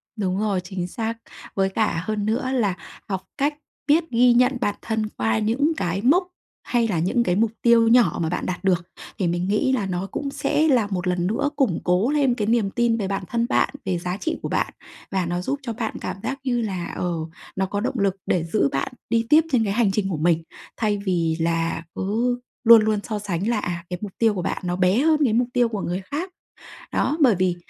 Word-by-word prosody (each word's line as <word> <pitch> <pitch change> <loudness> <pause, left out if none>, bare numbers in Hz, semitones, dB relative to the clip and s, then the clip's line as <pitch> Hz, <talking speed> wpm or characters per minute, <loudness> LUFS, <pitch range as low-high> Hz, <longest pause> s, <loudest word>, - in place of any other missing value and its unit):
Đúng 190 -3 -1
rồi, 205 -3 0
chính 180 -1 -4
xác. 225 +4 -3 0.4
Với 195 -1 +2
cả 190 -4 0
hơn 215 -1 -2
nữa 235 +4 0
là 225 -8 +1 0.4
học 190 -2 -2 0.2
cách 290 +1 +1 0.3
biết 310 +4 +4
ghi 245 +1 +5
nhận 250 +2 +3
bản 205 -3 0
thân 220 -1 -2
qua 110 0 +1
những 255 +9 +1
cái 175 +3 -1
mốc 340 - +3 0.4
hay 235 -2 +1
là 185 -7 0
những 190 +8 +1
cái 180 -5 +1
mục 220 +2 +2
tiêu 235 -1 +5
nhỏ 230 -7 +4
mà 160 - 0
bạn 180 - -2
đạt 180 +1 -4
được, 180 -3 +2 0.3
thì 185 - 0
mình 175 +2 -1
nghĩ 210 +7 +2
là 245 -7 0
nó 185 0 -3
cũng 285 - -3
sẽ 310 +2 +1
là 245 -8 +3
một 185 -2 -3
lần 180 -1 0
nữa 225 +8 0
củng 240 - +1
cố 180 +7 +2
lên 285 -4 +3
cái 210 -3 -2
niềm 225 -3 +2
tin 235 0 +1
về 200 -4 -2
bản 195 0 -2
thân 235 0 0
bạn, - - +3 0.2
về 185 -2 0
giá 180 +2 -3
trị 320 +9 -2
của - - -4
bạn. - - -1 0.4
Và 190 -2 0
nó 175 +1 -2
giúp 275 +10 -2
cho 235 -3 -3
bạn 225 0 -3
cảm - - -3
giác 270 +1 -3
như 245 -3 0
là, 190 -6 -3
ờ, 180 - -1 0.4
nó 190 - 0
có 200 +2 -3
động 250 +3 -2
lực 195 -1 +1
để 175 - +1
giữ 165 -3 +1
bạn 135 - -2 0.2
đi 230 0 +2
tiếp 310 +2 +7
trên 245 -4 +3
cái 200 -2 -1
hành 220 -3 +2
trình 195 0 -1
của 175 - -2
mình. 165 +1 +2 0.3
Thay 210 -3 +1
vì 165 -4 +1
là 165 0 0
cứ 235 +5 0 0.2
luôn 230 -1 +9
luôn 215 -1 +1
so 215 -3 -3
sánh 195 -1 -2
là, 235 -3 +1
à, 170 -3 -4
cái 180 -1 -4
mục 205 -2 -5
tiêu 225 -2 +3
của 185 - -3
bạn - - -2
nó 175 0 -1
bé 185 +4 +3
hơn 310 +2 +3
cái 240 -6 +2
mục 240 +2 +2
tiêu 245 -2 +3
của 210 -3 -3
người 180 +2 -2
khác. 325 +7 -2 0.6
Đó, 300 - +1
bởi 255 -7 +6
vì, 185 -1 +1
210 Hz, 235 wpm, -23 LUFS, 180-240 Hz, 0.6 s, luôn